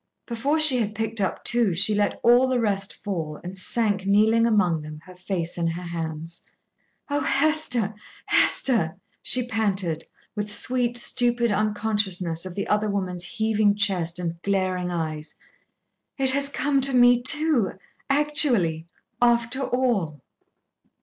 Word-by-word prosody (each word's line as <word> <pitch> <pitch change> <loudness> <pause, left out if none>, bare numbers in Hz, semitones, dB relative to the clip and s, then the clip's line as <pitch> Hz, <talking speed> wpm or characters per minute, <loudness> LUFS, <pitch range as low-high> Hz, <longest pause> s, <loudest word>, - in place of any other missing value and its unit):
Before 270 +7 -1
she 295 -5 +5
had 215 -2 -2
picked 225 0 -2
up 190 - -2
two, 235 -7 +1
she 205 +4 +4
let 205 -1 0
all 245 +2 +5
the 255 -1 0
rest 200 -4 -1
fall, 160 -7 -5
and 180 +2 -7
sank 200 0 +1
kneeling 220 +3 +3
among 185 -7 +2
them, 150 0 -9
her 185 - -14
face 180 -2 -4
in 170 - 0
her 170 +2 -4
hands. 165 -1 -6 0.7
"Oh, 285 0 -1
Hester, 270 -8 0 0.3
Hester!" 205 -12 +2 0.3
she 250 -1 +2
panted, 195 -8 -2 0.3
with 210 0 -3
sweet, 240 +3 0
stupid 240 -1 +1
unconciousness 205 -5 -1
of 180 - -9
the 200 - -3
other 210 0 0
woman's 180 -3 -3
heaving 220 -2 +1
chest 185 -5 0
and 170 -1 -4
glaring 185 -2 -1
eyes. 155 -3 -5 0.8
"It 265 -2 +2
has 280 +1 +1
come 280 0 0
to 270 0 +1
me 245 0 +5
too, 285 -4 +1 0.4
actually, 265 - +2 0.3
after 240 +2 +2
all." 235 - -1
210 Hz, 140 wpm, -24 LUFS, 180-245 Hz, 0.8 s, she